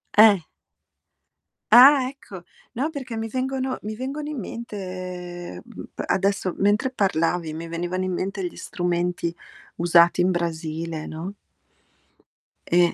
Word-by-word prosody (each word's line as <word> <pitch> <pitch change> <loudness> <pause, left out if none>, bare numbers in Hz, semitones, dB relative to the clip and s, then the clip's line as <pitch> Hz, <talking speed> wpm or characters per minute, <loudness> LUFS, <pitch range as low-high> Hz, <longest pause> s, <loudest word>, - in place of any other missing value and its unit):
Eh. 210 -2 +8 1.3
Ah, 265 +2 +9
ecco, 230 -9 -10 0.3
no 265 +6 -1
perché 260 -7 -6
mi 225 0 -2
vengono 260 +2 -2
mi 215 +1 -5
vengono 280 +4 -4
in 300 -4 -4
mente, 230 +1 -6 0.8
ehm, 90 - -9
mhmm, - - -10 0.2
adesso 195 -1 +1
mentre, 205 +6 +2
parlavi 170 -6 0
mi 165 +2 -6
venivano 175 +2 -2
in 185 - -2
mente 190 +1 -2
gli - - -10
strumenti 175 -1 -2 0.4
usati 170 +1 +5
in 180 +1 +3
Brasile, 165 -2 -3
no? 165 +5 -6 1.4
Eh 175 0 +4
190 Hz, 125 wpm, -24 LUFS, 170-245 Hz, 1.4 s, Ah